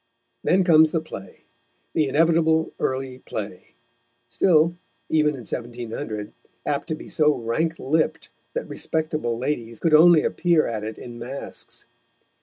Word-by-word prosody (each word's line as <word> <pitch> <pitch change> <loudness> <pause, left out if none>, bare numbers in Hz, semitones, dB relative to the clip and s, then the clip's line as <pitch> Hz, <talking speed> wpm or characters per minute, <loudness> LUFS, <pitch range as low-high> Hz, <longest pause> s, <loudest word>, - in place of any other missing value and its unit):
Then 185 +2 +3
comes 160 -3 +6
the 165 - 0
play, 125 -11 -10 0.5
the 155 -3 +2
inevitable 160 +2 +3
early 130 -1 -2
play, 100 -6 -7 0.5
still, 165 +5 +3 0.3
even 150 -2 +2
in 130 - -8
1700, 115 -2 -5 0.3
apt 145 +2 -1
to 160 - -2
be - - -11
so 150 -1 +3
rank 155 +8 -1
lipped 155 +4 0 0.3
that - - -3
respectable 155 -7 -2
ladies 120 -3 -3
could 165 - +1
only 165 +1 +7
appear 170 -3 +2
at 110 -2 -3
it 110 0 -5
in 120 -1 -9
masks. 130 +4 -7
150 Hz, 135 wpm, -24 LUFS, 120-160 Hz, 0.5 s, only